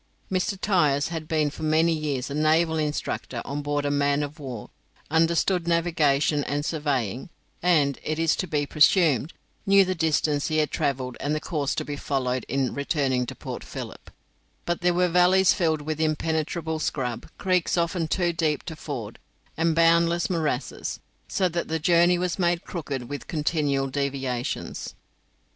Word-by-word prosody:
Mr. 185 Hz, +1 st, -1 dB
Tyers 150 Hz, -9 st, +2 dB
had 165 Hz, -2 st, -5 dB
been 155 Hz, -2 st, +1 dB
for -, -, -11 dB
many 160 Hz, +2 st, +3 dB
years 145 Hz, -4 st, -2 dB
a -, -, -3 dB
naval 160 Hz, +2 st, +2 dB
instructor 150 Hz, -1 st, -3 dB
on 145 Hz, +1 st, -3 dB
board 145 Hz, 0 st, -1 dB
a 145 Hz, -, +1 dB
man 145 Hz, 0 st, +2 dB
of 145 Hz, +1 st, -7 dB
war, 125 Hz, -7 st, -7 dB, 0.4 s
understood 165 Hz, +2 st, +2 dB
navigation 155 Hz, -4 st, +2 dB
and 145 Hz, +1 st, -2 dB
surveying, 135 Hz, -, -2 dB, 0.3 s
and, 150 Hz, -6 st, +2 dB
it 155 Hz, 0 st, -2 dB
is 165 Hz, -1 st, +2 dB
to 185 Hz, -, -3 dB
be 150 Hz, -2 st, 0 dB
presumed, 150 Hz, -, +3 dB, 0.3 s
knew 195 Hz, -1 st, +5 dB
the 185 Hz, -, 0 dB
distance 155 Hz, -3 st, +1 dB
he 155 Hz, -, 0 dB
had 155 Hz, -1 st, +1 dB
travelled 135 Hz, -5 st, -2 dB
and 150 Hz, +1 st, -1 dB
the -, -, -1 dB
course 150 Hz, -4 st, -2 dB
to -, -, -2 dB
be 145 Hz, -, -4 dB
followed 130 Hz, -3 st, -2 dB
in 135 Hz, -2 st, 0 dB
returning 135 Hz, -3 st, 0 dB
to -, -, -6 dB
Port -, -, -7 dB
Philip; -, -, -8 dB, 0.6 s
but 175 Hz, 0 st, -1 dB
there 175 Hz, 0 st, +2 dB
were 180 Hz, 0 st, +3 dB
valleys 180 Hz, +2 st, +5 dB
filled 160 Hz, -4 st, 0 dB
with 155 Hz, +1 st, -3 dB
impenetrable 160 Hz, +1 st, -1 dB
scrub, 125 Hz, -6 st, -3 dB
creeks 185 Hz, -2 st, +1 dB
often 170 Hz, -1 st, 0 dB
too 175 Hz, +1 st, 0 dB
deep 155 Hz, -3 st, 0 dB
to 160 Hz, -, -6 dB
ford, 125 Hz, -8 st, -6 dB, 0.4 s
and 165 Hz, 0 st, +1 dB
boundless 170 Hz, +2 st, +3 dB
morasses, 155 Hz, -6 st, -2 dB, 0.3 s
so 185 Hz, -, +1 dB
that 170 Hz, -1 st, -3 dB
the 160 Hz, -, -1 dB
journey 175 Hz, +2 st, +4 dB
was 180 Hz, +1 st, -2 dB
made 175 Hz, -1 st, +1 dB
crooked 140 Hz, -8 st, -5 dB
with 145 Hz, +2 st, -6 dB
continual 150 Hz, -3 st, 0 dB
deviations. 135 Hz, -3 st, -3 dB
155 Hz, 165 wpm, -25 LUFS, 145-170 Hz, 0.6 s, knew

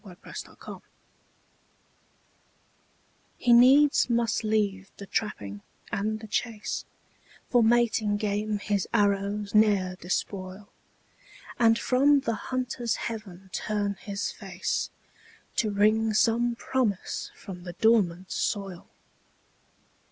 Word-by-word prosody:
THE 205 Hz, -, -12 dB
INDIAN -, -, -13 dB
CORN -, -, -8 dB
PLANTER -, -, -10 dB, 2.5 s
He 245 Hz, -, +3 dB
needs 270 Hz, +4 st, +6 dB
must 235 Hz, -1 st, +1 dB
leave 205 Hz, -3 st, 0 dB
the 200 Hz, -, -8 dB
trapping 105 Hz, -, -3 dB, 0.3 s
and 215 Hz, +2 st, -1 dB
the -, -, -8 dB
chase, 220 Hz, 0 st, -3 dB, 0.7 s
For 245 Hz, -, +5 dB
mating 225 Hz, -2 st, +2 dB
game 210 Hz, 0 st, -1 dB
his 205 Hz, -1 st, -1 dB
arrows 200 Hz, 0 st, +1 dB
ne'er 205 Hz, -4 st, +3 dB
despoil, 185 Hz, +2 st, -4 dB, 0.9 s
And 225 Hz, -1 st, +5 dB
from 275 Hz, +4 st, +3 dB
the 230 Hz, -, -1 dB, 0.2 s
hunter's 250 Hz, -2 st, -1 dB
heaven 195 Hz, -5 st, -7 dB
turn 205 Hz, -2 st, -1 dB
his 200 Hz, 0 st, -4 dB
face, 190 Hz, -3 st, -3 dB, 0.7 s
To 220 Hz, -, +2 dB
wring 215 Hz, +2 st, +2 dB
some 235 Hz, +2 st, +2 dB
promise 235 Hz, -6 st, -2 dB
from 180 Hz, -2 st, -9 dB
the 175 Hz, -1 st, -7 dB
dormant 190 Hz, -3 st, +2 dB
soil. 195 Hz, -4 st, -3 dB
210 Hz, 105 wpm, -27 LUFS, 195-230 Hz, 2.5 s, needs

